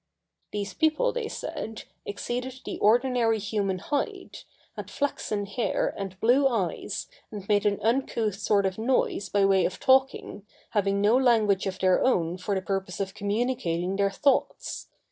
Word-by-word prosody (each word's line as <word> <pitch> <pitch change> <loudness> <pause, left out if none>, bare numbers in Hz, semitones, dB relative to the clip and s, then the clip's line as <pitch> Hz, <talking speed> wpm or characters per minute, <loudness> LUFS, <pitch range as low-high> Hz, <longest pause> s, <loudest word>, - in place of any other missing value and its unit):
These 200 -2 -4
people, 315 - +2
they 480 -3 -2
said, 225 - -6 0.2
exceeded 250 +5 -4
the - - -5
ordinary 235 0 +3
human 200 -2 -1
height, 340 - -4 0.3
had - - -7
flaxen 215 -7 -2
hair, 205 +4 -1
and 195 -1 -6
blue 260 +4 +4
eyes, 215 -9 -2 0.3
and 205 -3 -8
made 205 0 +3
an 200 -1 0
uncouth 230 -2 +1
sort 205 -1 +2
of 190 +2 -2
noise 230 -4 0
by 200 -1 +3
way 195 -1 +4
of 185 - -2
talking, 265 -5 +2 0.3
having 200 -2 +1
no 210 +3 +4
language 220 -7 +3
of 190 -1 -3
their 185 -1 +3
own 180 -8 +1
for 200 +2 -2
the 190 - -2
purpose 190 -2 -3
of 195 -1 -3
communicating 205 -4 -1
their 200 0 +2
thoughts. 270 +8 0
210 Hz, 155 wpm, -27 LUFS, 195-250 Hz, 0.3 s, blue